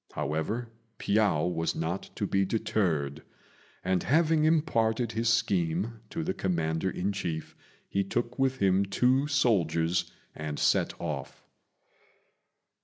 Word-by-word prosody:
However, 105 +11 -2 0.3
Piao 100 -7 +2
was 80 -2 -1
not 80 +4 -3
to 105 - -1
be 95 0 +2
deterred; 85 -9 0 0.6
and 95 -1 +1
having 155 +2 +3
imparted 120 -8 +2
his 115 0 0
scheme 105 -1 +1
to 165 - -3
the 185 +4 -1
commander 85 - -1
in 95 +2 -1
chief, 85 -5 -4 0.3
he 100 - 0
took 120 +6 -3
with 135 -1 +2
him 95 -3 +3
two 125 +8 +2
soldiers 90 - +1 0.2
and 75 -1 -5
set - - +1
off. 75 -5 -5
100 Hz, 120 wpm, -29 LUFS, 85-120 Hz, 0.6 s, having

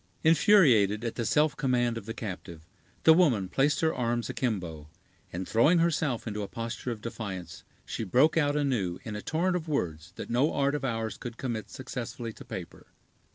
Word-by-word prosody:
Infuriated 140 - +5
at 115 - -2
the 115 -2 -2
self 150 0 +3
command 120 -3 +1
of 115 -2 -7
the 115 - -3
captive, 90 -6 -7 0.4
the 160 - +8
woman 135 - +3
placed 135 +9 +1
her 160 0 +2
arms 120 -1 -1
akimbo; 85 - -3 0.4
and, 90 +1 -5
throwing 135 +10 +4
herself 160 -7 +1
into 105 -2 -3
a 100 - -3
posture 115 +3 -5
of 115 -3 -4
defiance, 95 -7 -6 0.2
she - - -4
broke 130 - +3
out 145 -3 +2
anew, 120 -12 0
in 110 - -6
a 105 - -4
torrent 180 - 0
of 170 -2 -3
words 85 - -2
that - - -6
no 130 +6 +2
art 140 0 +2
of 150 - -2
ours 115 -3 -2
could 120 -2 -7
commit 110 -6 -4
successfully 120 -2 -6
to - - -12
paper. - - -8
120 Hz, 185 wpm, -28 LUFS, 105-145 Hz, 0.4 s, the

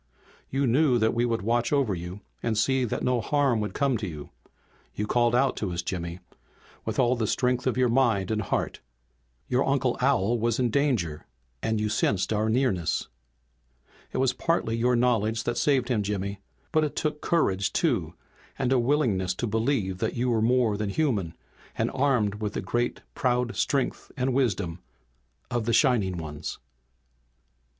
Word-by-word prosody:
"You 135 +1 0
knew 130 +1 +3
that 110 -1 +2
we 120 +1 +1
would 115 -3 -1
watch 120 +2 +1
over 140 -8 +2
you 90 +3 -6 0.2
and 110 -2 -1
see 130 +3 +2
that 115 - -3
no 125 -2 +1
harm 135 -1 +2
would 105 0 -3
come 140 -4 +1
to 105 -2 -4
you. 75 -4 -8 0.6
You 105 - -1
called 120 +1 +2
out 135 +1 +3
to 100 -4 -2
us, 85 0 -3
Jimmy, 85 -1 -4 0.7
with - - -3
all 125 0 +3
the 115 -3 -1
strength 125 +2 0
of 130 - 0
your 130 -1 +4
mind 115 -6 +2
and 110 -1 0
heart. 100 - -2 0.7
Your 125 +2 +2
Uncle 135 -2 +1
Al 120 -4 +2
was 115 0 +1
in 125 -3 +1
danger 115 - 0 0.3
and 110 -1 0
you 105 - 0
sensed 105 -1 +1
our 110 +1 +1
nearness. 110 -8 0 1.0
"It - - -4
was 130 -1 +2
partly 130 -4 0
your 120 +2 +2
knowledge 115 -2 +1
that 120 - -1
saved 130 -1 +2
him, 115 -4 +1
Jimmy. 100 -1 -3 0.3
But 155 -2 +3
it 150 - -2
took 150 -1 -2
courage 100 - +1
too, - - 0 0.4
and 135 -1 +1
a 130 - +4
willingness 120 -9 +1
to 120 - -2
believe 110 -4 0
that - - -1
you 125 +1 0
were 115 -2 +2
more 115 -2 +2
than 105 -1 -2
human, 100 - 0 0.4
and - - 0
armed 115 -7 +1
with 105 -1 -2
the - - -2
great 120 0 -1
proud 125 -2 0
strength 135 -2 -1
and 130 0 0
wisdom 100 -10 0 0.7
of 120 -2 -1
the 115 - +1
Shining 110 - +3
Ones." 80 -2 -6
120 Hz, 175 wpm, -27 LUFS, 105-130 Hz, 1.0 s, your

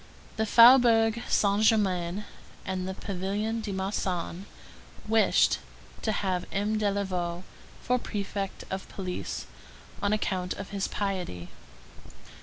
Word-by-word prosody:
The 220 0 0
Faubourg 230 -1 +7
Saint 200 0 +3
Germain 195 -3 +2 0.4
and 185 -1 -3
the 190 - -4
pavilion 200 +4 -3
de 215 -2 -4
Marsan 190 -1 -3 0.6
wished 220 0 +4 0.4
to 220 - 0
have 185 -3 -1
M. 210 +2 0
Delaveau 185 -4 -1 0.4
for 250 0 +1
prefect 200 -3 -4
of 190 0 -4
police, 185 -2 -5 0.6
on 200 - +1
account 185 -4 -1
of 195 -1 -8
his 200 -1 -1
piety. 180 - -3
200 Hz, 110 wpm, -28 LUFS, 185-215 Hz, 0.6 s, Faubourg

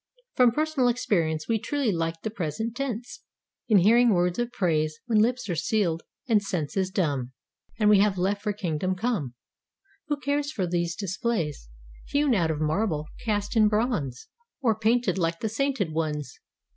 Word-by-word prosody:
From 250 -2 +5
personal 305 -1 +1
experience. 165 -10 0
We 225 -1 +1
truly 265 +1 0
like 165 -2 -2
the 220 - -2
present 210 +5 -3
tense 245 -3 -4 0.5
In 215 - +5
hearing 235 +6 +5
words 175 +3 +1
of 240 0 -1
praise. 155 -7 0
When 225 -3 +2
lips 240 +3 +1
are 175 - -1
sealed, 170 -2 0 0.3
and 220 -4 +4
senses 190 -1 -2
dumb. 140 -9 -1 0.4
And 215 -2 +2
we 210 -1 +6
have 200 -1 +3
left 195 +3 0
for 210 - -1
Kingdom 185 -2 -2
Come 180 - -2 0.7
Who 295 -2 -1
cares 285 +2 -1
for 200 -11 -1
these 170 -1 -1
displays 190 - -2 0.4
Hewn 285 -2 +2
out 170 -7 +2
of 155 -2 -1
marble—cast 200 +6 -1
in 215 -1 +6
bronze 210 - -1 0.3
Or 240 -6 +2
painted 220 -3 +1
like 165 -1 0
the 220 - -2
sainted 230 - -1
ones. 150 -5 -3
200 Hz, 160 wpm, -26 LUFS, 165-235 Hz, 0.7 s, we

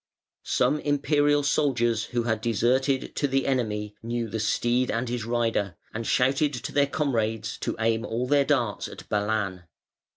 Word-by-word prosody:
Some 135 +5 +2
Imperial 145 0 +2
soldiers 120 -6 +1
who 120 -1 -2
had 110 -2 -1
deserted 125 +4 +1
to 145 - +2
the 135 0 0
enemy 105 -5 -1
knew 115 0 -2
the 110 - -3
steed 120 +4 +1
and 115 +2 -1
his 120 -2 -3
rider, 115 -6 0 0.2
and 115 +1 -4
shouted 135 +3 +2
to 120 - -5
their 140 -1 +3
comrades 115 -6 -1
to - - -2
aim 115 0 +1
all 120 +1 -2
their 140 +2 +3
darts 125 -7 0
at - - -11
Balan. 105 -3 -1
120 Hz, 160 wpm, -26 LUFS, 110-135 Hz, 0.2 s, their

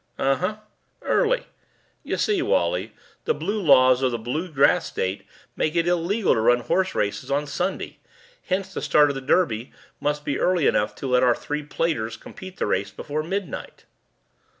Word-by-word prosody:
"Uh 135 0 +2
huh. 185 +5 -2 0.5
Early. - - +1 0.6
Y'see, 410 -4 0
Wally, - - 0 0.3
the 465 - +1
blue 210 +1 -2
laws 130 -5 +5
of 130 - +3
the 120 - -2
blue 150 +10 -4
grass 140 -2 +3
state 95 +2 -3 0.3
make 155 +2 -1
it 170 0 +2
illegal 175 +4 +2
to 115 - 0
run 120 +2 +4
horseraces 120 - -1
on 145 +2 0
Sunday, 180 +6 -3 0.5
hence 190 +1 -2
the - - -4
start 150 -1 +4
of 140 - -2
the 135 - -4
Derby 130 -5 +1 0.3
must 150 +1 -2
be 140 - -1
early 180 -5 +2
enough 105 - +1
to 135 - -5
let 125 -1 +3
our 125 -2 +4
three 150 +1 -4
platers 145 -7 -2
complete 185 -1 -11
the - - -1
race 100 +1 0
before 145 +9 -4
midnight." 190 +1 -5
150 Hz, 170 wpm, -24 LUFS, 130-185 Hz, 0.6 s, laws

